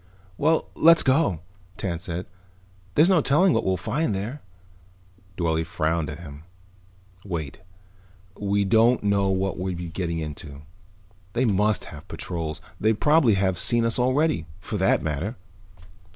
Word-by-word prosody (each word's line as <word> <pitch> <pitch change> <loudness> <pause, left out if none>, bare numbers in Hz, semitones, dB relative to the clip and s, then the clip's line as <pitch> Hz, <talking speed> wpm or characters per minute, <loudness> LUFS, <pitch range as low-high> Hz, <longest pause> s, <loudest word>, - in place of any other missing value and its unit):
"Well, 160 +8 +1
let's 165 0 +6
go," 130 - +2 0.4
Tance 85 -4 -3
said. 90 0 -4 0.7
"There's 155 - +6
no 185 -4 +4
telling 165 +7 +3
what - - +1
we'll 95 -1 +1
find 115 - -1
there." 115 +9 -5 1.0
Dorle 80 -2 0
frowned 80 -2 -1
at 75 - -6
him. 70 -3 -10 0.8
"Wait. 80 -8 -5 0.8
We 100 0 0
don't 115 +4 +4
know 100 -1 +2
what 95 0 -1
we 90 - -4
would 90 -2 -3
be 85 0 -5
getting 85 -1 -3
into. 75 -2 -7 0.7
They 125 +2 +1
must 105 -1 +1
have - - -11
patrols. 80 -3 -5 0.2
They 110 +1 +3
probably 145 -1 +4
have 95 -2 0
seen 120 +2 +2
us 115 +1 +1
already, 130 - +1
for - - -5
that - - +2
matter." 80 - -2
95 Hz, 145 wpm, -24 LUFS, 85-120 Hz, 1.0 s, let's